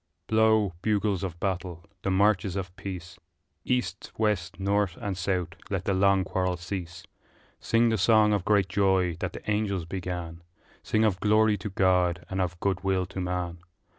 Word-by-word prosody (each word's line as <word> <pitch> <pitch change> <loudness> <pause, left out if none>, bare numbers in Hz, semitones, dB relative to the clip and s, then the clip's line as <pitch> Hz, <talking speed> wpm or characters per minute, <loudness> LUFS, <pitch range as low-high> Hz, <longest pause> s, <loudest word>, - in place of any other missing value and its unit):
Blow, 110 -3 +3
bugles 105 -3 +1
of 85 -3 -5
battle, 90 -3 -3 0.2
the - - -1
marches 95 -1 +2
of 95 -2 -4
peace; 90 -3 -7 0.4
East, 125 0 -2
west, 105 -6 0
north, 100 -2 0
and 100 -2 -3
south 90 0 -1 0.2
let 95 -2 -2
the 100 - +1
long 95 0 +3
quarrel 90 -1 -1
cease 90 -1 -6 0.6
Sing 115 +1 +2
the 110 -2 0
song 105 +1 +5
of 100 -3 0
great 100 -2 +3
joy 95 -2 +2
that - - -3
the - - -10
angels 105 -4 0
began, 85 -2 -5 0.4
Sing 110 0 +1
of 95 -4 +1
glory 110 0 +4
to 105 +1 -5
God 90 -2 +2
and 95 0 0
of 90 -1 -2
good 95 -1 -1
will 95 -1 +1
to 95 +1 -6
man! 90 -1 -3
95 Hz, 165 wpm, -27 LUFS, 90-105 Hz, 0.6 s, song